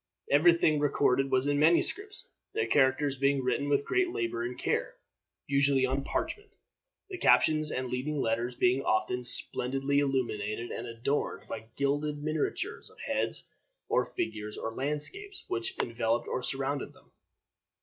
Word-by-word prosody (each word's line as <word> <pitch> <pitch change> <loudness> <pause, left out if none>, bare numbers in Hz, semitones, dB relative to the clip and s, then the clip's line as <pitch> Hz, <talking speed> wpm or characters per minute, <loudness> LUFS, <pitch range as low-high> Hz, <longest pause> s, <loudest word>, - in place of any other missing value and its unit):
Every 165 +4 +6
thing 155 -3 +3
recorded 135 -2 +2
was 130 0 +2
in 145 0 +1
manuscripts, 405 - +1 0.2
the 445 - +1
characters 135 0 +2
being 140 -1 +2
written 140 +3 0
with 140 0 +2
great 380 -1 +2
labor 350 -2 -2
and 355 +1 -4
care, - - -1 0.5
usually 140 -1 +3
on 135 +1 -1
parchment, 415 - -3 0.6
the 370 - -5
captions 155 -1 +4
and 130 0 -2
leading 135 +4 -2
letters 120 +1 0
being 125 +3 +3
often 125 +1 0
splendidly 135 +3 +1
illuminated 120 -5 -1
and - - -5
adorned 115 +5 -2
by 110 0 -6
gilded 145 +1 0
miniatures 155 0 -2
of - - -20
heads, - - -1 0.4
or - - +3
figures, 105 -1 -4
or 110 - -4
landscapes, 150 - -4
which 375 0 -2
enveloped 115 0 0
or - - -2
surrounded 135 +1 -2
them. - - -23
140 Hz, 145 wpm, -30 LUFS, 125-155 Hz, 0.6 s, Every